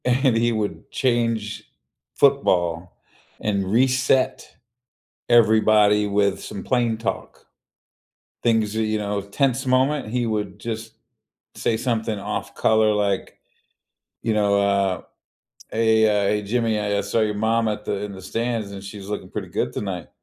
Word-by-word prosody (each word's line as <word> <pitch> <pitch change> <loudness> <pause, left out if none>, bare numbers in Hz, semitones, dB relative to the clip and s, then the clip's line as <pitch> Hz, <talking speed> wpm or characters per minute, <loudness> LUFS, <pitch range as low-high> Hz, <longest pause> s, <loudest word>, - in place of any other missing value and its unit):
And 125 0 +3
he 120 +1 +2
would 110 -2 -3
change 115 -4 0 0.5
football 90 -11 +1 0.4
and 100 -2 -1
reset 130 +2 +1 0.7
everybody 110 -3 +5
with 100 -1 +1
some 100 - -7
plain 120 -3 +1
talk. 115 - -5 1.0
Things 110 -2 +1
that, 110 - 0
you 110 0 0
know 100 -1 -2
tense 130 +6 0
moment, 130 +1 +2
he 120 +1 -1
would 105 -2 -3
just 110 -1 -5 0.6
say 115 - 0
something 110 -3 -1
off 100 0 -4
color 110 -1 +3
like, 100 -2 -1 0.8
you 115 - 0
know, 100 -1 +2
uh, 100 -2 +1 0.7
"Hey, 110 0 +3
uh, 105 -2 +2
hey, 105 0 0
Jimmy, 110 0 0
I, 105 -1 -1
uh, 100 - +1
saw 100 +3 0
your 105 -1 +1
mom 110 +2 +1
at 105 0 -3
the - - -1
in 105 - -5
the 95 -1 -10
stands, 115 0 -3
and 100 -1 -8
she's 100 0 -9
looking 105 - -5
pretty - - -5
good 65 - -2
tonight," 95 -4 -4
110 Hz, 145 wpm, -23 LUFS, 100-115 Hz, 1.0 s, everybody